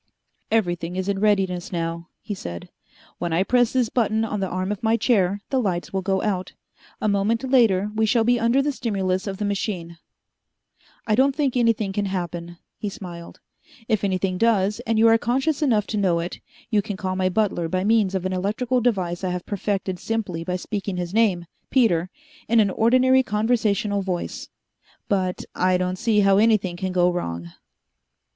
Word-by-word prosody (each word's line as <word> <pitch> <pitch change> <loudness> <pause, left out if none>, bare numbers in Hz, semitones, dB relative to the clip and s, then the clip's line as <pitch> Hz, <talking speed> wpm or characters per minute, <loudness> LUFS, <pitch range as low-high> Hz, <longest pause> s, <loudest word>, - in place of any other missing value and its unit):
"Everything 175 -5 0
is 185 0 -2
in 200 -1 0
readiness 195 -4 +1
now," 170 -1 -3
he 210 - -5
said. 85 - -7 0.5
"When 175 - -2
I 170 +3 +2
press 245 +2 +2
this 250 -4 +1
button 220 -2 +1
on 210 -2 -3
the 190 - -1
arm 185 +2 -2
of 210 - -4
my 225 0 +2
chair, 200 -5 +1
the 265 -2 +2
lights 180 -5 -2
will 190 - 0
go 190 0 0
out. 190 -3 -2 0.5
A - - -1
moment 210 +4 +1
later 225 -7 +3
we 220 0 +1
shall 230 +1 +3
be 245 +1 +3
under 235 +4 +3
the 295 - 0
stimulus 195 -6 -2
of 195 -1 -4
the 210 - -2
machine. 185 -5 -3 1.1
I 215 - +1
don't 265 +4 +3
think 285 -4 0
anything 225 -5 +1
can 205 +1 -1
happen." 175 -2 -4 0.2
He 210 - -3
smiled. 175 -5 -9 0.5
"If 215 -4 0
anything 185 -1 0
does, 210 -2 +2
and 225 -1 +1
you 225 +1 +6
are 225 0 +5
conscious 270 +6 0
enough 225 -8 +2
to 215 - -3
know 185 -4 +2
it, 170 +2 -5 0.3
you 210 -2 +3
can 200 -1 -5
call 185 -2 -3
my 185 0 +1
butler 185 -4 0
by 185 +1 -1
means 210 -2 +2
of 185 -1 -2
an 185 - -1
electrical 220 +7 0
device 185 -7 0
I 185 - 0
have 180 0 -4
perfected 195 -2 -2
simply 200 -7 -3
by 180 +2 -2
speaking 195 0 -4
his 175 0 -4
name, 205 -6 +2 0.2
Peter, 185 -9 +2 0.4
in 230 +1 +4
an 205 -3 +3
ordinary 255 +5 +4
conversational 210 -3 0
voice. 185 -2 -4 0.6
But 185 -2 -1
I 185 0 +2
don't 180 0 -2
see 225 -3 +3
how 195 0 +4
anything 210 -5 +2
can 185 +1 -3
go 180 -1 +3
wrong." 85 - -4
200 Hz, 185 wpm, -23 LUFS, 185-225 Hz, 1.1 s, you